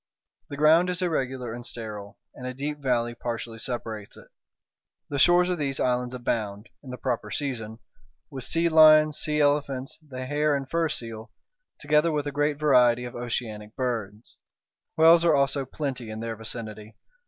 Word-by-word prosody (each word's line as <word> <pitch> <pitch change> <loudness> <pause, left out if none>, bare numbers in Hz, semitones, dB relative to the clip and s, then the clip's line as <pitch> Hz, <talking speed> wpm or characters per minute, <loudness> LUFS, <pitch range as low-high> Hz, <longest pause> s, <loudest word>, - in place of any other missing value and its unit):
The 145 - -6
ground 160 +4 +5
is 180 0 -1
irregular 130 -8 -2
and 120 +1 -7
sterile, 105 -4 -7 0.2
and 125 - -8
a 130 - -5
deep 150 +2 -4
valley 120 -3 0
partially 115 -1 -5
separates 110 -4 -5
it. - - -15 0.8
The 140 - -2
shores 175 +4 +5
of 180 -2 -1
these 135 -2 -2
islands 125 0 0
abound, 110 -3 -3
in 135 - -12
the 125 - -6
proper 120 -5 -2
season, 115 -3 -3 0.5
with 130 -2 -5
sea 165 +5 +1
lions, 155 -2 +6
sea 150 0 0
elephants, 145 -1 0
the 130 -4 -7
hair 145 +2 +1
and 135 -1 -3
fur 165 +2 0
seal, 115 -4 -5 0.5
together 150 +2 +2
with 150 -1 -1
a 145 - -3
great 145 +1 0
variety 125 -5 +4
of 120 - -7
oceanic 115 -3 -5
birds. 115 -4 -4 0.6
Whales 165 +1 +7
are 165 -3 +4
also 140 0 +1
plenty 130 -5 -4
in 110 0 -6
their 115 0 -4
vicinity. 110 -1 -7
130 Hz, 165 wpm, -26 LUFS, 115-150 Hz, 0.8 s, Whales